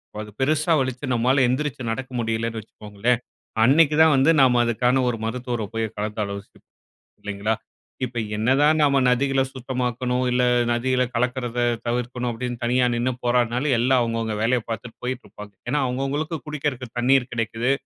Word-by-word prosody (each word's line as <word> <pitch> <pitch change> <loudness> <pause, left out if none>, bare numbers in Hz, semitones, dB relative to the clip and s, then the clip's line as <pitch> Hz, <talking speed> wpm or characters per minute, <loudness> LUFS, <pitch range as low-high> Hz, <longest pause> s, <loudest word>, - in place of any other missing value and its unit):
பார்த்து 105 0 -6
அது - - -46
பெருசா 155 +4 +1
வலிச்சு 130 +1 -2
நம்மால 130 +3 +3
எழுந்திரிச்சு 130 +1 -2
நடக்க 130 +3 -5
முடியல்லைன்னு 115 0 -2
வச்சுக்கோங்களேன், 105 +3 -2 0.4
அன்னைக்கி 150 +5 +5
தான் 160 -1 +6
வந்து 135 +4 +4
நம்ம 125 -2 +5
அதுக்கான 125 +3 +2
ஒரு 120 - -2
மருத்துவர 120 0 -3
போய் 115 -1 -2
கலந்து 105 +1 -3
ஆலோசிப்போம் 100 0 -8 0.5
இல்லைங்களா? 105 +2 -2 0.5
இப்ப 125 -1 -8 0.2
என்னதான் 135 +8 +3
நம்ம 140 -2 +4
நதிகள 135 +2 +2
சுத்தமாக்கணும், 125 -1 -2
இல்ல 125 0 +2 0.3
நதிகள 125 +2 +1
கலக்குறத 125 0 -1 0.2
தவிர்க்கணும் 125 +1 -2
அப்டின்னு 120 +1 -4
தனியா 125 +1 +2
நின்னு 120 +2 0
போராடினாலும், 125 +3 +1
எல்லாம் 130 +1 +3
அவங்கவங்க 115 -2 -1
வேலைய 120 +3 +2
பார்த்துட்டு 115 +1 -6
போயிட்டுருப்பாங்க. 120 -4 -6 0.2
ஏன்னா, 145 +4 +1
அவங்கவங்களுக்கு 140 +6 -2
குடிக்கறக்கு 145 -4 -3
தண்ணீர் 125 +1 +3
கிடைக்குது, 115 +2 -1
125 Hz, 145 wpm, -23 LUFS, 115-130 Hz, 0.5 s, தான்